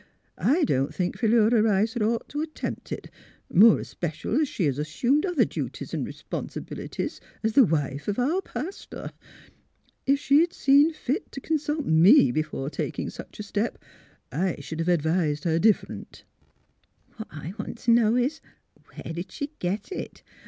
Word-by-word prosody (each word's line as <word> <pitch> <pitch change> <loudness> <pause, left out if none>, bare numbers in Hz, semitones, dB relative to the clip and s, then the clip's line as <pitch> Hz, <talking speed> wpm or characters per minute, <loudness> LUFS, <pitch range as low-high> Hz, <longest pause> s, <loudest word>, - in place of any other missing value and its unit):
I 315 +6 +2
don't 135 - +1
think 180 -1 -1
Philura 225 0 +4
Rice 215 +1 +2
'd 240 - -3
ought 225 +2 0
t' 295 - -3
attempt 310 0 -5
it, - - -6 0.4
more 215 +4 +7
especial 175 - -2
as 305 - +2
she 210 - -2
has 140 -1 0
assumed 245 - +1
other 355 -5 +3
duties - - -5
an' - - -2
r'ponsibilities - - -5 0.2
as 220 0 +1
the 270 - +7
wife 145 -4 -1
of 205 - -1
our 300 +10 +1
pastor. 380 0 -7 1.0
If 275 +1 +4
she'd 305 +5 +3
seen 285 +3 +5
fit 310 - -3
t' - - -6
consult 300 0 -1
me 165 - +6
be 155 - +1
fore 150 -2 -5
taking - - -3
such - - -11
a - - -3
step, 210 +3 -2 0.5
I 185 0 0
sh'd 155 +3 -7
have 165 +2 0
advised 160 -2 +1
her 165 -1 +1
different." 215 +2 0 0.5
'' - - -38
What 220 - -7
I 155 +3 -7
want 210 - -5
t' 235 - +1
know 230 -1 +4
is, 255 +6 0 0.5
where 165 - -6
did 175 +3 -6
she 285 +8 -5
get 195 - -3
it? 375 - -6
220 Hz, 165 wpm, -26 LUFS, -, 1.0 s, more